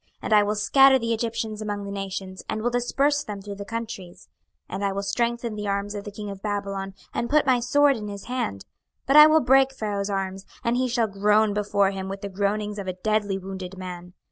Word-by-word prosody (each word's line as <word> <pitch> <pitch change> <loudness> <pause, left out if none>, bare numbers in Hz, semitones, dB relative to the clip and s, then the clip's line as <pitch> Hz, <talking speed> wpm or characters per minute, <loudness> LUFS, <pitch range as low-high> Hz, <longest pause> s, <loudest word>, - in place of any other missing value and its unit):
26:030:023 - - -39
And - - 0
I 210 - +7
will 210 +1 -1
scatter 270 +5 +6
the 230 -2 -1
Egyptians 220 -1 -3
among 205 -1 -3
the 200 - -6
nations, 195 -1 -5
and 215 0 -2
will 240 - +1
disperse 275 +4 +1
them 210 -5 -6
through 200 +1 -7
the 200 0 -7
countries. 200 - -7 0.4
26:030:024 - - -3
And 200 +1 -2
I 200 - +1
will 200 +1 -3
strengthen 235 +3 -1
the 210 -1 -4
arms 200 +1 -1
of 205 -1 -6
the 205 - -6
king 205 0 -6
of 195 -1 -9
Babylon, 195 -2 -3 0.2
and 235 - -2
put 300 0 +3
my 255 -2 +4
sword 280 +4 +3
in 210 -1 -6
his 200 -1 -7
hand: 100 - -3 0.4
but 275 - +2
I 300 0 +11
will 315 0 +5
break 270 +1 +4
Pharaoh's 210 -5 -3
arms, 195 -1 -3 0.2
and 235 +1 +1
he 255 +1 +1
shall 240 -1 +1
groan 210 +1 +2
before 200 -1 +1
him 190 -1 -5
with 195 0 -6
the 200 - -5
groanings 205 +2 -1
of 195 - -6
a 185 - -1
deadly 215 -2 +1
wounded 190 -1 -7
man. 180 -1 -8
205 Hz, 235 wpm, -25 LUFS, 195-235 Hz, 0.4 s, I